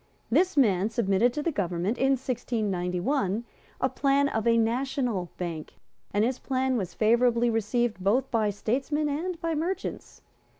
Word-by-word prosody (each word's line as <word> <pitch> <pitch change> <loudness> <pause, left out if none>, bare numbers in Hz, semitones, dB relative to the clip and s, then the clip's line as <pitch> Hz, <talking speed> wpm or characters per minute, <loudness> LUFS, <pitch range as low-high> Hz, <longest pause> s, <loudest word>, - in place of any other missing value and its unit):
This 350 +6 +2
man 205 -6 +3
submitted 225 0 +2
to 295 - -3
the 335 - 0
government, 190 - -1
in 270 +1 +3
1691, 215 -3 -1 0.4
a 260 - +2
plan 275 +2 +2
of 220 -3 -1
a 230 0 +4
national 235 -4 0
bank; 165 -4 -5 0.4
and 205 +2 +2
his 255 +1 -1
plan 260 -1 0
was 185 -7 -3
favourably 235 +1 +3
received 225 -2 0
both 245 +7 +1
by 220 -3 +2
statesmen 270 +9 -1
and 330 +4 -3
by 330 -1 -1
merchants. 335 +5 -4
235 Hz, 145 wpm, -27 LUFS, 205-270 Hz, 0.4 s, a